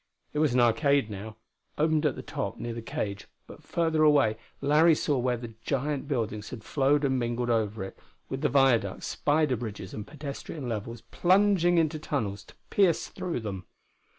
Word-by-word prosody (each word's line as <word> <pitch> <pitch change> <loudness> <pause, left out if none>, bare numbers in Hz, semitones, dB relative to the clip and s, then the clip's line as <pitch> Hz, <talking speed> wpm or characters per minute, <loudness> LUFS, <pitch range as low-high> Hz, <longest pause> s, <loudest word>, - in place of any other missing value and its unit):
It 150 - -1
was 150 -5 +2
an - - +4
arcade, 135 0 +3
now, 105 +2 -7 0.4
open 155 0 +2
at 135 - -1
the - - -7
top 100 +1 -4
near 120 0 -4
the 115 - -5
cage; 105 -3 -4 0.2
but - - -13
further 160 -2 0
away 145 -8 +4 0.2
Larry 155 +3 +5
saw 145 -3 0
where 125 0 0
the 115 -1 -8
giant 140 +2 -2
buildings 110 -6 -2
had 115 -4 -8
flowed 145 +3 +2
and 130 -1 +1
mingled 120 0 -1
over 110 -3 0
it, 95 - -9 0.3
with 135 0 -4
the 150 - +2
viaducts, 130 -8 +2
spider 150 -2 +1
bridges 105 -5 -6
and 105 - -6
pedestrian 145 -1 -6
levels 115 +1 -4
plunging 185 -1 +4
into 155 -2 +1
tunnels 105 -10 -3
to - - -17 0.2
pierce 190 -5 +3
through 170 -9 -4
them. 95 -4 -6
135 Hz, 180 wpm, -28 LUFS, 110-150 Hz, 0.4 s, Larry